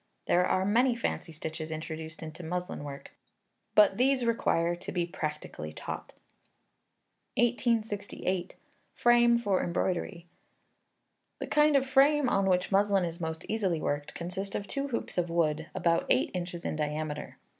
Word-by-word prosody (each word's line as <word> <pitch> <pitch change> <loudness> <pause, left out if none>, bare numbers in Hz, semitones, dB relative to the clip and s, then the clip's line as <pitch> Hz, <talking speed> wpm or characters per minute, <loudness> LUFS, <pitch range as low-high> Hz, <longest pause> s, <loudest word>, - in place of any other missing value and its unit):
There 180 - +3
are 185 +1 +1
many 240 +5 +3
fancy 230 -7 -3
stitches 160 0 -5
introduced 160 0 -6
into 160 +2 -8
muslin 180 -1 -4
work, 140 -1 -8 0.6
but 205 -2 +6
these 255 0 +3
require 175 -7 +1
to - - -7
be 175 -2 0
practically 150 - -5
taught. - - -7 1.2
1868. 215 -6 0 0.4
Frame 240 0 +5
for 205 -5 +1
Embroidery. 175 0 -2 1.1
The - - -4
kind 300 0 +4
of 270 -1 +4
frame 275 +1 +4
on 195 -3 +2
which 180 +1 +1
muslin 200 -1 +3
is 170 +1 -5
most 160 -1 -4
easily 195 -7 0
worked, 145 -1 -3
consists 190 +3 -4
of 200 - -2
two 275 +5 -3
hoops 235 -7 -2
of 175 -1 -1
wood, 160 -2 +1
about 170 -2 +1
eight 125 - +3
inches 175 -1 -4
in - - -1
diameter. 150 0 -3
180 Hz, 145 wpm, -30 LUFS, 160-225 Hz, 1.2 s, but